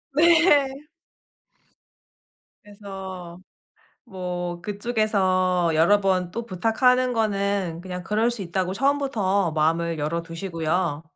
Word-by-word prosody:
네. 300 -4 +4 1.8
그래서 190 -4 -9 0.7
뭐 180 -5 -5
그쪽에서 190 -4 0
여러 170 +6 +4
번 185 -2 0
또 230 +5 -5
부탁하는 250 +6 +2
거는 200 -6 -1
그냥 180 0 -6
그럴 215 +4 +1
수 235 -4 -5
있다고 185 +1 -2
처음부터 220 - 0
마음을 165 +1 0
열어 155 +3 -2
두시고요. 165 -2 -2
190 Hz, 215 characters per minute, -24 LUFS, 175-225 Hz, 1.8 s, 네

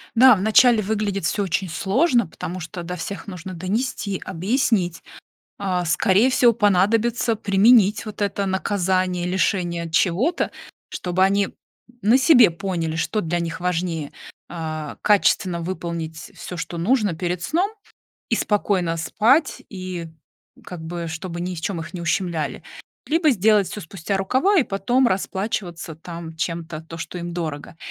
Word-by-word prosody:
Да, 255 0 +8
вначале 220 +3 +5
выглядит 200 -3 -1
всё 205 +5 0
очень 185 0 -1
сложно, 235 - +2
потому 180 +2 -6
что 170 +1 -7
до 180 +1 -5
всех 190 +2 -6
нужно 185 -1 -7
донести, 200 +2 -2
объяснить. 190 -2 0 0.5
А, 185 -3 -1
скорее 190 +9 +3
всего 245 -2 +5
понадобится 220 +3 +2
применить 210 +1 +4
вот 215 -1 -7
это 200 0 0
наказание, 185 -2 0
лишение 180 -2 0
от 165 - -7
чего-то. 200 - +1 0.4
Чтобы 180 +1 0
они, 200 +1 +2 0.5
на 225 +6 +5
себе 260 - +6
поняли, 170 -3 -3
что 210 +6 -1
для 170 +1 -1
них 165 -1 -4
важнее, 170 -4 -2 0.4
а, 155 -3 -5
качественно 190 -4 +2
выполнить 165 -3 -5
всё, 180 - -7
что 170 - -5
нужно 210 0 +2
перед 175 +1 -2
сном, 365 - 0 0.6
и 230 - +2
спокойно 190 -6 0
спать, 235 - +2
и 185 -3 -6 0.6
как 175 -3 -8
бы 170 0 -5
чтобы 170 +2 -5
ни 180 0 -3
в 160 - -7
чём 180 -3 -2
их 165 - -8
не 175 - -5
ущемляли. 170 -3 -2 0.4
Либо 320 0 +3
сделать 210 -3 +3
всё 210 - -6
спустя 190 +3 -3
рукава 265 - +2
и - - +3
потом 240 +6 +1
расплачиваться 190 -4 -3
там 165 0 -8
чем-то, 165 -1 -4
то, 165 +1 -10
что 165 +2 -6
им 175 0 -5
дорого. 160 -2 -5
185 Hz, 145 wpm, -22 LUFS, 170-210 Hz, 0.6 s, Да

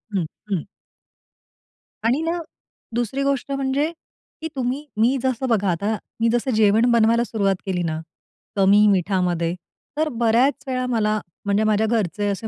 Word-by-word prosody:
हं, 180 -4 +1 0.2
हं. 185 -6 -1 1.4
आणि 255 +6 +2
ना, 330 +2 -1 0.6
दुसरी 245 +4 -1
गोष्ट 275 -1 -1
म्हणजे 275 +3 0 0.5
की 320 - -2
तुम्ही 260 +3 -2
मी 240 +5 +3
जसं 260 0 0
बघा 205 -4 +2
आता 200 +6 -1 0.2
मी 230 0 +3
जसं 240 +2 0
जेवण 220 +3 +4
बनवायला 235 0 +4
सुरुवात 200 -5 0
केली 180 -2 -1
ना, 160 -1 -2 0.6
कमी 200 +2 +5
मिठामध्ये, 180 -3 +1 0.4
तर 310 0 +1
बऱ्याच 240 +5 +2
वेळा 255 -1 -1
मला 215 -3 +1 0.3
म्हणजे 200 +1 +2
माझ्या 215 0 +2
घरचे 210 -2 0
असे 200 +3 -3
225 Hz, 145 wpm, -22 LUFS, 200-260 Hz, 1.4 s, कमी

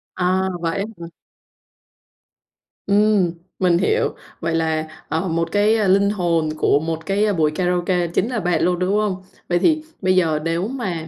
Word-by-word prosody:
À, 185 +1 +1
vậy 165 +3 -1
á 200 - -1 0.2
hả? - - -5 1.8
Ừm, 205 -3 +3 0.3
mình 180 -2 +3
hiểu. 450 - +1 0.2
Vậy 165 0 -1
là, 160 -1 0 0.2
ờ, 165 +4 -1
một 165 0 -1
cái, 210 +2 +3
a, 215 -3 +1
linh 200 +2 +4
hồn 170 -6 0
của 145 - +3
một 160 0 -4
cái 205 +1 +1
buổi 155 -4 +2
karaoke 180 +1 0
chính 185 +7 -1
là 240 - -2
bạn 175 -4 0
luôn, 180 0 +1
đúng 185 +2 0
hông? 195 -3 -1 0.3
Vậy 175 0 +2
thì 310 - +2 0.2
bây 185 0 +2
giờ 160 -4 +2
nếu 165 +4 -1
mà 190 -11 -4
180 Hz, 175 wpm, -20 LUFS, 165-200 Hz, 1.8 s, linh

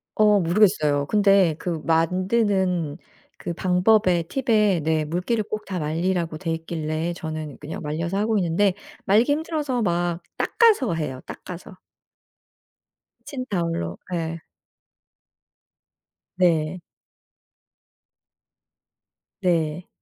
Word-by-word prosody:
어 210 -1 +5
모르겠어요. 165 -6 +3
근데 195 -5 +4
그 165 -4 -3
만드는 180 -1 +1 0.4
그 170 - -4
방법에 180 0 +3
팁에 210 - +1
네 155 0 +1
물기를 180 +8 -1
꼭 215 +1 -5
다 185 -3 -4
말리라고 165 +1 -1
돼 165 -1 -5
있길래 160 0 -3
저는 155 -4 -6
그냥 155 - -7
말려서 165 +5 -2
하고 215 +1 +1
있는데 180 +2 +2 0.3
말리기 225 +8 +4
힘들어서 295 -5 -1
막 175 -2 0 0.2
닦아서 410 - +3
해요 130 -5 -4
닦아서. 180 +2 -9 1.5
키친타월로 170 - -3 0.2
예. 165 -1 -2 2.0
네. 170 -1 +1 2.6
네. 170 -2 0
175 Hz, 205 characters per minute, -23 LUFS, 160-205 Hz, 2.6 s, 어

